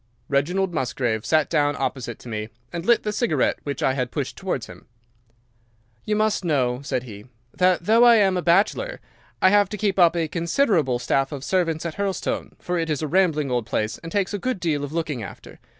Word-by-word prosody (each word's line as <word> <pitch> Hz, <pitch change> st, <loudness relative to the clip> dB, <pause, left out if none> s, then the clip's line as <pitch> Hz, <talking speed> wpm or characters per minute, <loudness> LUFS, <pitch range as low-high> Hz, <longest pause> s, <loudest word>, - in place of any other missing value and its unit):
"Reginald 175 Hz, +7 st, 0 dB
Musgrave 120 Hz, -6 st, -1 dB
sat 155 Hz, -1 st, +3 dB
down 145 Hz, -2 st, +1 dB
opposite 120 Hz, -3 st, -3 dB
to -, -, -14 dB
me, 110 Hz, -1 st, -4 dB, 0.2 s
and 170 Hz, -, -4 dB
lit 235 Hz, -1 st, +4 dB
the 210 Hz, -, -1 dB
cigarette 205 Hz, -, +1 dB
which 140 Hz, -2 st, -4 dB
I 130 Hz, -, +3 dB
had 125 Hz, -2 st, -2 dB
pushed 140 Hz, -1 st, -4 dB
towards 180 Hz, -, -3 dB
him. -, -, -14 dB, 1.2 s
"'You 210 Hz, -, 0 dB
must 215 Hz, -2 st, +1 dB
know,' 130 Hz, -6 st, 0 dB
said 130 Hz, -3 st, -2 dB
he, 105 Hz, -4 st, -10 dB, 0.3 s
'that 180 Hz, -2 st, +2 dB
though 225 Hz, +4 st, +5 dB
I 240 Hz, -1 st, +8 dB
am 195 Hz, -4 st, +3 dB
a 180 Hz, -, 0 dB
bachelor, 205 Hz, -, +1 dB, 0.4 s
I 185 Hz, -, +6 dB
have 205 Hz, -1 st, +4 dB
to 210 Hz, -, -5 dB
keep 200 Hz, -2 st, 0 dB
up 175 Hz, -1 st, +5 dB
a 165 Hz, -2 st, 0 dB
considerable 170 Hz, -, +1 dB
staff 135 Hz, +2 st, 0 dB
of 140 Hz, -3 st, -6 dB
servants 165 Hz, -2 st, 0 dB
at 165 Hz, -, -4 dB
Hurlstone, 200 Hz, -2 st, -2 dB
for 175 Hz, -1 st, -2 dB
it 165 Hz, -1 st, -2 dB
is 150 Hz, 0 st, -1 dB
a -, -, -1 dB
rambling 155 Hz, -5 st, +1 dB
old 120 Hz, -3 st, -1 dB
place, 110 Hz, 0 st, -2 dB
and 165 Hz, -, -9 dB
takes 200 Hz, +1 st, 0 dB
a 205 Hz, -, -2 dB
good 255 Hz, -1 st, -2 dB
deal 155 Hz, -4 st, -1 dB
of 145 Hz, -, -5 dB
looking 155 Hz, -6 st, -2 dB
after. 100 Hz, -, -10 dB
165 Hz, 210 wpm, -23 LUFS, 135-190 Hz, 1.2 s, I